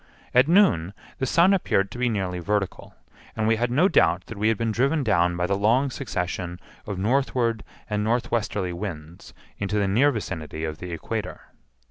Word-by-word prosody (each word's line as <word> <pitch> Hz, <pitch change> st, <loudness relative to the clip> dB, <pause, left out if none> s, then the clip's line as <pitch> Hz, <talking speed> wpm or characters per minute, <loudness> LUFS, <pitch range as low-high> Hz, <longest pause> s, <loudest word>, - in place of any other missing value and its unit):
At 125 Hz, +2 st, +5 dB
noon 100 Hz, -, +3 dB, 0.2 s
the 130 Hz, -, 0 dB
sun 175 Hz, +8 st, +4 dB
appeared 100 Hz, -, +1 dB
to 120 Hz, -, -8 dB
be 125 Hz, -1 st, +2 dB
nearly 95 Hz, -5 st, -2 dB
vertical, 100 Hz, +2 st, -3 dB, 0.4 s
and 110 Hz, -1 st, 0 dB
we 115 Hz, 0 st, +3 dB
had 120 Hz, +2 st, 0 dB
no 150 Hz, +10 st, +4 dB
doubt 90 Hz, -, +3 dB
that 115 Hz, -, -9 dB
we 110 Hz, -, +2 dB
had 110 Hz, -1 st, +2 dB
been 115 Hz, 0 st, -1 dB
driven 140 Hz, +7 st, +1 dB
down 90 Hz, -6 st, +2 dB
by 90 Hz, -, 0 dB
the 100 Hz, +2 st, 0 dB
long 120 Hz, +7 st, +2 dB
succession 90 Hz, -8 st, -4 dB, 0.3 s
of 100 Hz, -3 st, -4 dB
northward 115 Hz, +1 st, 0 dB, 0.2 s
and 105 Hz, -1 st, -1 dB
northwesterly 110 Hz, -5 st, -1 dB
winds 85 Hz, -3 st, -8 dB, 0.2 s
into 100 Hz, +1 st, -1 dB
the 100 Hz, -1 st, +1 dB
near 125 Hz, +9 st, +4 dB
vicinity 80 Hz, -, -5 dB
of 80 Hz, -1 st, -4 dB
the 90 Hz, 0 st, -7 dB
equator. 85 Hz, -, -5 dB
105 Hz, 180 wpm, -24 LUFS, 90-125 Hz, 0.4 s, At